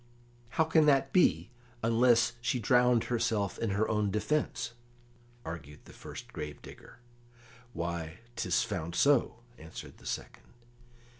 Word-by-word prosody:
"How 160 - +6
can 160 -1 +4
that 135 -1 +3
be, 85 - +3 0.3
unless 115 0 +4
she 125 - 0
drowned 125 +1 +4
herself 110 -5 -1
in 115 - -1
her 100 +2 +1
own 105 -2 +1
defence?" 115 +3 -1 0.7
argued 75 -3 -8
the - - -14
first - - -10
grave 75 -1 -6
digger. - - -13 0.8
"Why, 85 -1 -4 0.2
'tis 90 -6 +1
found 85 -5 -4
so," 135 -4 +3 0.2
answered 80 +1 -10
the - - -11
second. - - -6
110 Hz, 130 wpm, -31 LUFS, 85-125 Hz, 0.8 s, How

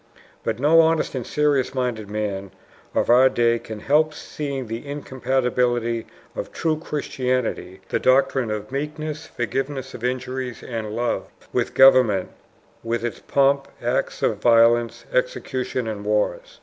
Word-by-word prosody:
But - - -1
no 150 +6 +5
honest 160 -1 +1
and 130 -4 -4
serious 145 -3 +1
minded 120 -5 -2
man 100 -2 -3 0.5
of - - +2
our 130 +2 +7
day 120 -2 +2
can 110 -2 -8
help 150 +3 +2
seeing 140 -3 -5
the 115 +1 -5
incompatibility 125 -4 -1 0.3
of - - -5
true 160 -1 0
Christianity 130 - -2
the - - 0
doctrine 130 -2 +3
of 105 +1 -4
meekness, 150 +2 -4
forgiveness 135 +3 -3
of 120 - -9
injuries, 130 0 -3
and 110 -3 -4
love 120 +1 -1 0.3
with - - -1
government, 125 -8 +6 0.5
with 115 0 -2
its 115 - -4
pomp, 140 0 +2
acts - - -1
of - - +1
violence, 115 0 +4
executions, 130 - -1
and 105 -2 -4
wars. 105 0 -1
125 Hz, 135 wpm, -23 LUFS, 115-140 Hz, 0.5 s, our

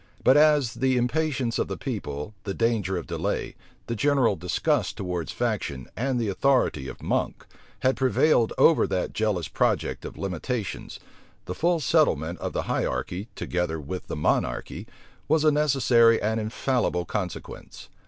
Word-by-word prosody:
But 130 - +6
as 150 -5 +4
the 130 +2 +1
impatience 130 -1 0
of - - 0
the - - -5
people, 75 +8 -5
the 100 -1 -4
danger 110 -5 0
of 85 - -5
delay, - - -3 0.3
the 115 - -3
general 135 -2 +2
disgust 95 - 0
towards 90 -5 -3
faction, 65 -3 -2
and 130 +1 -1
the 115 - -1
authority 100 - +1
of - - -9
Monk, - - -1 0.4
had 130 +1 +2
prevailed 130 -2 +3
over 165 - +5
that 95 -2 -2
jealous 105 -7 0
project - - 0
of - - -8
limitations, 100 - -4 0.5
the 90 - -4
full 170 - +1
settlement 90 - +1
of - - -3
the - - -2
hierarchy, 90 - -2
together 90 -2 -2
with 85 +5 -6
the - - -4
monarchy, 75 - -1 0.4
was 155 +1 +3
a 155 - +5
necessary 130 -6 +4
and 110 +2 0
infallible 110 -4 -1
consequence. 95 -1 -6
115 Hz, 150 wpm, -26 LUFS, 90-135 Hz, 0.5 s, But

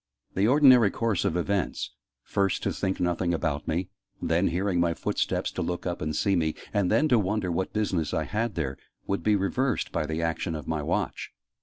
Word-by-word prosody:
The 100 +3 +2
ordinary 130 -5 +7
course 110 -2 0
of 85 - +1
events 95 +2 -1 0.3
first, 100 -2 0
to - - 0
think 95 -1 -2
nothing 90 0 +1
about 75 -3 -2
me; 85 +3 -1 0.3
then, 85 +3 +1
hearing 90 +1 0
my 85 -1 +2
footsteps - - -1
to - - -4
look 90 0 -3
up 90 -1 -3
and 80 0 -2
see 100 -1 +2
me; 80 -3 0 0.2
and 100 -4 +2
then 155 - +3
to 120 - +5
wonder 100 -2 0
what 95 +3 -1
business 95 -7 -1
I - - 0
had 115 0 -2
there 65 -5 -3 0.3
would 100 - -1
be 105 -1 +3
reversed 115 +7 0
by 75 - -1
the 80 +1 -2
action 80 +1 -1
of 75 -3 -7
my 80 -2 -1
Watch. 75 - -2
90 Hz, 200 wpm, -27 LUFS, 80-100 Hz, 0.3 s, ordinary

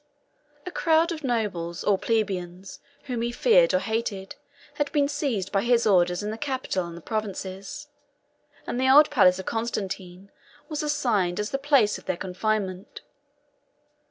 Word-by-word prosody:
A 360 - -5
crowd 330 0 +2
of 320 -2 -5
nobles 195 -9 -2
or 205 - +3
plebeians, 190 -4 -2 0.2
whom 250 -4 -3
he 235 +1 -1
feared - - +4
or - - +3
hated, 220 -6 -3 0.4
had 290 -1 -2
been 285 -1 +2
seized 275 - -2
by 195 - +2
his 235 0 +2
orders 180 -2 +3
in 210 - -3
the 220 - -6
capital 260 -10 -2
and 170 0 -9
the - - -10
provinces; 200 - -5 0.8
and 245 - -3
the 260 - +3
old 295 +3 +7
palace 185 -10 +5
of 190 - -7
Constantine 195 -4 -4 0.4
was 305 0 -2
assigned 230 -12 0
as 210 - -2
the 275 - -1
place 275 -7 +3
of - - -20
their 175 - -2
confinement. 190 0 -3
215 Hz, 155 wpm, -25 LUFS, 190-275 Hz, 0.8 s, old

